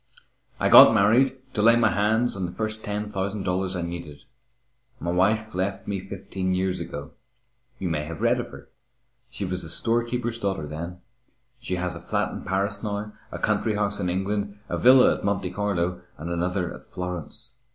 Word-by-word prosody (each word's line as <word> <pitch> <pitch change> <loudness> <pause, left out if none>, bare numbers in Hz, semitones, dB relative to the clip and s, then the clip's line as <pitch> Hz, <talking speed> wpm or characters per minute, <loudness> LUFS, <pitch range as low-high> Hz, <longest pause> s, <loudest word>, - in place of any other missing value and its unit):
I - - +2
got - - +10
married 125 +7 +4 0.2
to 105 - 0
lay 115 +2 +7
my 115 -2 +3
hands 110 +4 +1
on 95 -2 -2
the - - -7
first 110 +3 -4
ten 105 +1 -3
thousand 100 0 -2
dollars 95 0 -1
I 90 - -2
needed. 85 -4 -7 0.8
My 85 - -2
wife 105 +5 +1
left 95 +2 -2
me 100 -1 -2
fifteen 95 -1 -3
years 95 0 0
ago. 85 -4 -6 0.7
You 95 - -3
may 75 -3 -1
have 80 0 -7
read - - +2
of - - -3
her. - - -12 0.6
She 100 - -4
was 90 0 -3
a 80 - -7
storekeeper's 120 +4 -1
daughter 95 -7 -2
then. 85 +4 -6 0.6
She 90 - -2
has 90 0 -2
a - - -7
flat 85 - -1
in - - -6
Paris 100 +2 -1
now, 105 0 -4 0.2
a - - -5
country 110 - +1
house 105 0 0
in 90 -2 -1
England, 100 +2 -2
a - - -1
villa 130 +1 +7
at - - -6
Monte 100 -2 -1
Carlo 90 -3 -1 0.2
and 85 +3 -5
another 90 +1 -1
at - - -13
Florence. 90 +6 -6
95 Hz, 185 wpm, -25 LUFS, 90-105 Hz, 0.8 s, got